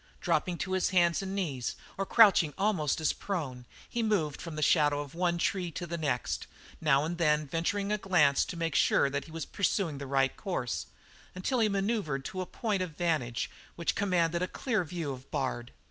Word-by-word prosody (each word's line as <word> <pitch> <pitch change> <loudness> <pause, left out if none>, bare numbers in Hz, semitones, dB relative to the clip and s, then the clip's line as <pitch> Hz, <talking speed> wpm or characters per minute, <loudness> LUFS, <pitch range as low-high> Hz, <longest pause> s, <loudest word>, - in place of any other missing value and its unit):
Dropping 180 -2 0
to 185 +3 -3
hands 175 -2 +3
and 195 0 -4
knees, 140 -11 -2 0.2
or 195 0 -2
crouching 195 -9 +6
almost 185 -9 +1
as 155 - +1
prone, 135 -11 -4 0.2
he 235 - -2
moved 190 -10 0
from 165 -3 -6
the 155 - -1
shadow 145 -3 +4
of 145 -1 -9
one 175 0 +1
tree 180 0 0
to 175 - -4
the 170 0 -4
next, 145 -7 -2 0.3
now 150 -2 +3
and 170 +2 -4
then 150 -2 +3
venturing 185 +7 -1
a 210 - +1
glance 155 -8 +4
to 175 - -6
make 165 -2 -1
sure 140 - +3
that 140 +1 -2
he 160 - -13
was 165 -2 -4
pursuing 180 -6 0
the 140 - -6
right 135 -1 +2
course, 175 - -3 0.5
until 215 +8 -1
he 220 -2 +3
manoeuvred 195 - -1
to 185 - -4
a 185 - -4
point 210 -5 -1
of 170 -5 -4
vantage 155 -10 0 0.3
which 170 - 0
commanded 175 -4 +1
a 180 - +1
clear 220 -4 -1
view 165 -3 -4
of 130 0 -9
Bard. 130 -4 -2
170 Hz, 195 wpm, -30 LUFS, 145-190 Hz, 0.5 s, crouching